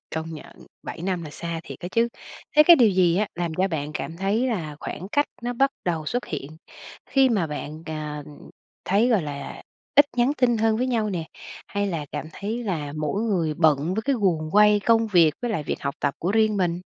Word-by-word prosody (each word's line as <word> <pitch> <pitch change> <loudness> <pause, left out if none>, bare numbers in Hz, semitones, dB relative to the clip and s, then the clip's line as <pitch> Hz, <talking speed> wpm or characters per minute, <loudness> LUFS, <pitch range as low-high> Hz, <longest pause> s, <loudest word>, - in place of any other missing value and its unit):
Công 160 +1 -3
nhận, 155 - -13 0.2
7 - - -7
năm 180 -2 -1
là 150 - -7
xa 170 +1 -5
thiệt - - -9
đó 175 - -4
chứ. 230 +1 +3 0.5
Thế 300 - +10
cái 340 +2 +8
điều 240 -6 +6
gì 180 -3 +3
á 210 +2 +2
làm 170 -2 -3
cho 190 +3 +1
bạn 150 -4 -3
cảm 165 - -4
thấy 200 +7 0
là 165 -11 -3
khoảng 185 - -6
cách 290 0 +3 0.2
nó 245 +1 -2
bắt 270 +3 +2
đầu 165 -3 -2
xuất 245 +9 -2
hiện 150 0 -6 0.5
khi 270 -1 +4
mà 205 -9 +1
bạn, 150 +1 -6
à, 150 -2 -5 0.6
thấy, 210 +6 +3
gọi 215 -8 +3
là, 145 -1 -6 0.3
ít 285 +1 +8
nhắn 245 +3 +3
tin 240 -3 +3
hơn 220 0 +2
với 250 - 0
nhau 225 -4 0
nè, 175 -4 -3 0.4
hay 205 0 -2
là 165 -6 -3
cảm 150 0 -4
thấy 220 +7 -4
là 155 -8 -3
mỗi 155 +8 -1
người 170 -9 0
bận 155 +2 +2
với 220 - -1
cái 275 +3 +1
guồng 160 -6 +1
quay 210 0 +6
công 225 +2 +3
việc, 170 -7 +4
với 240 - -1
lại 185 -8 -1
việc - - -4
học 140 0 -2
tập 140 -1 0
của 175 - -1
riêng 215 -1 +3
mình? 175 -2 0
185 Hz, 225 wpm, -24 LUFS, 155-225 Hz, 0.6 s, Thế